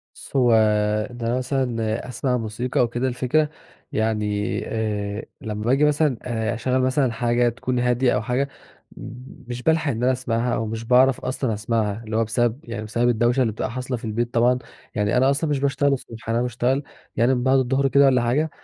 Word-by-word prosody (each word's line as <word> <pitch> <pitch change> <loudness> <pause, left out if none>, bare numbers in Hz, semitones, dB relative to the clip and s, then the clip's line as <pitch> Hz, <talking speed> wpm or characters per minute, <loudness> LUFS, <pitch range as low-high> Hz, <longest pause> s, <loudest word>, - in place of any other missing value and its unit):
بُصّ، - - -13
هو 125 -3 +4 0.6
ده 120 0 -2
مثلًا 125 -4 -1
أسمَع 125 0 -1
موسيقى 115 +2 -3
أو 125 - +4
كده، 120 +3 -2
الفكرة 130 +5 +1 0.4
يعني 105 -2 -1
آآ، 105 -1 -3 0.2
لمّا 105 -1 -4
باجي 135 +5 +3
مثلًا 150 -3 +2
آآ 115 -2 -2
أشغّل 130 +3 0
مثلًا 130 0 +2
حاجة 120 +1 +1
تكون 125 +1 -2
هادية 125 +1 +2
أو 105 - 0
حاجة 125 +5 0 1.0
مش 125 0 -6
بالحَق 160 -2 +2
إن 115 -1 -3
أنا 130 - +4
أسمَعها 120 -1 -1
أو 115 - -2
مش 110 +1 -4
باعرَف 130 +2 +4
أصلًا 130 -2 -2
أسمَعها، 110 0 -1
اللي 110 -1 -5
هو 115 - +3
بسبب، 120 +2 0
يعني 115 -2 -6
بسبب 120 +3 0
الدوشة 120 +2 +2
اللي 115 -4 +1
بتبقى 110 - -3
حاصلة 125 +1 -3
في 115 - -9
البيت 120 +2 -2
طبعًا، 120 +2 +3 0.4
يعني 105 +1 +1
أنا 130 +2 +4
أصلًا 140 +3 0
مش 145 -2 0
باشتغل 140 0 +1
الصبح، 115 -4 -7
أنا 115 +1 +1
باشتغل 125 +3 0 0.3
يعني 120 +4 +3
من 125 - -2
بعد 130 +1 +4
الضُّهر 135 +2 +1
كده 140 +1 +5
والّا 130 -2 +4
حاجة 135 +7 +1
120 Hz, 190 wpm, -23 LUFS, 115-130 Hz, 1.0 s, كده